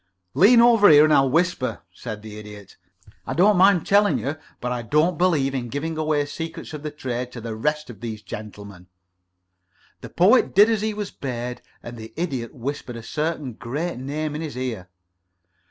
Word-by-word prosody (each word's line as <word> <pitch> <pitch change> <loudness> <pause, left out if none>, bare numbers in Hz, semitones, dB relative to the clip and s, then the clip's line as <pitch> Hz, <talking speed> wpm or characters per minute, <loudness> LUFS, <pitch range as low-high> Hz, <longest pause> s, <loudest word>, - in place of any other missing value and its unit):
"Lean 205 - +6
over 230 -3 +6
here 150 -1 +8
and 155 0 +4
I'll 135 -2 +4
whisper," 165 -3 0
said 110 -3 -8
the 105 -1 -9
Idiot. 105 -2 -12 0.5
"I - - -3
don't 200 +5 +5
mind 185 -1 +4
telling 205 0 +3
you, 145 +4 -3 0.2
but 125 - -3
I 125 -1 -2
don't 150 +9 +1
believe 155 -6 +1
in 125 -3 -3
giving 160 +5 -3
away 155 -1 0
the - - -8
secrets 160 +2 -7
of 150 - -6
the 155 - -4
trade 125 -4 -5
to 120 - -7
the 115 -1 -6
rest 150 +6 -1
of 105 - -14
these 110 -3 -6
gentlemen." 100 -4 -9 1.1
The - - -10
Poet 210 +8 +3
did 210 +4 +7
as 220 -2 0
he 215 0 -2
was 205 -2 -5
bade, 125 -2 -5 0.2
and 120 0 -8
the 110 0 -10
Idiot 135 -9 -4
whispered 130 -1 -5
a 115 - -8
certain 150 -2 -3
great 145 +8 -4
name 150 +3 -3
in 150 - -4
his 155 -5 -6
ear. 115 -8 -4
145 Hz, 190 wpm, -23 LUFS, 120-165 Hz, 1.1 s, here